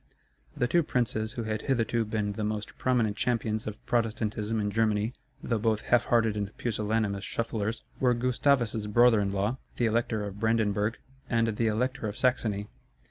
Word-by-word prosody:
The 125 - +2
two 170 +7 +3
princes 115 -6 -1
who 115 - -3
had 110 -1 -2
hitherto 115 -3 +1
been 105 -1 -1
the 105 - -4
most 105 0 -3
prominent 120 -5 +2
champions 110 -3 -1
of 105 0 -7
Protestantism 110 -1 0
in 105 -1 -1
Germany 110 +1 +1 0.3
(though 115 -2 0
both 110 0 +1
half 120 -1 +3
hearted 115 -3 +2
and 100 0 -4
pusillanimous 105 -3 -1
shufflers) 110 0 -2 0.2
were 125 -2 +3
Gustavus's 120 -3 +1
brother 120 +1 +5
in 100 -1 0
law, 100 +6 -1 0.2
the 120 - +2
Elector 110 -2 0
of 100 0 -7
Brandenburg, 110 -1 +1 0.3
and 115 -1 +2
the 115 +1 +1
Elector 120 +2 -1
of 105 - -5
Saxony. 110 -5 +1
110 Hz, 165 wpm, -28 LUFS, 105-120 Hz, 0.3 s, brother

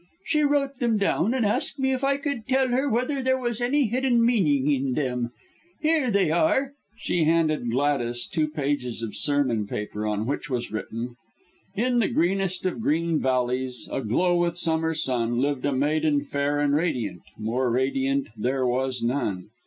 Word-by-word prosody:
She 305 -1 +1
wrote 280 -2 +1
them 235 -3 +2
down, 200 +3 +1
and 245 -4 +1
asked 210 +6 0
me 265 -1 +1
if 260 +1 -3
I 275 0 +2
could 280 -6 -4
tell 265 -1 +2
her 265 +3 +1
whether 255 +4 0
there 260 0 +2
was 240 -2 -3
any 275 +3 +2
hidden 240 0 +2
meaning 150 - +2
in 135 -2 0
them. 125 -4 -1 0.5
Here 310 -4 +2
they 195 -6 +2
are," 265 - +3
and 270 0 -5 0.3
she 175 -7 0
handed 155 -6 +2
Gladys 120 -2 0
two 155 -2 0
pages 140 -6 -2
of 110 - -5
sermon 120 -2 +1
paper 105 +1 -4
on 105 0 -1
which 145 +3 -3
was 120 -2 -3
written 115 +3 -5 0.6
"In 245 +3 +1
the 225 - +3
greenest 185 +1 0
of 185 +4 -1
green 165 -3 +1
valleys, 125 -1 -1
Aglow 175 +10 +1
with 175 0 0
summer 160 -1 0
sun, 120 -6 0
Lived 140 +1 0
a 145 - +1
maiden 145 +2 +1
fair 145 0 -1
and 145 -1 +2
radiant, 125 - -1 0.2
More 120 +4 -1
radiant 135 +2 0
there 130 +4 0
was 125 0 -1
none. 105 -6 -2
150 Hz, 175 wpm, -25 LUFS, -, 0.6 s, are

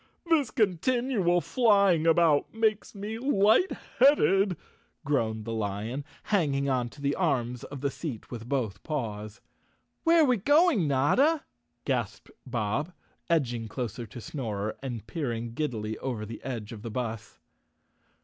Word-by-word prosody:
"This 320 -7 +2
continual 210 -2 +1
flying 200 - +3
about 165 -3 +4
makes 220 -1 0
me 210 +3 -5
light¬ 235 - +3 0.2
headed," 200 - +5 0.5
groaned 110 -6 0
the 115 - -3
lion, 110 +5 -3 0.2
hanging 145 -9 +1
on 125 -3 0
to 145 - -15
the 140 0 +1
arms 125 -9 -1
of 140 -2 -8
the 140 -1 0
seat 130 -9 -6
with 120 -1 -7
both 110 -9 -1
paws. 110 -7 -4 0.6
"Where 330 -1 +5
are - - +5
we 250 -3 +3
going, 290 - +4
Notta?" 250 - +3 0.4
gasped - - -2 0.2
Bob, 125 - -2 0.4
edging 120 -9 0
close 115 0 -4
to 120 -1 -7
Snorer 110 -5 -4
and 120 -5 -5
peering 120 -7 -3
giddily 110 -7 -3
over 120 -5 -3
the 115 +2 -9
edge 120 -4 -5
of 110 -3 -8
the 115 - -6
bus. 110 -2 -5
140 Hz, 140 wpm, -28 LUFS, -, 0.6 s, headed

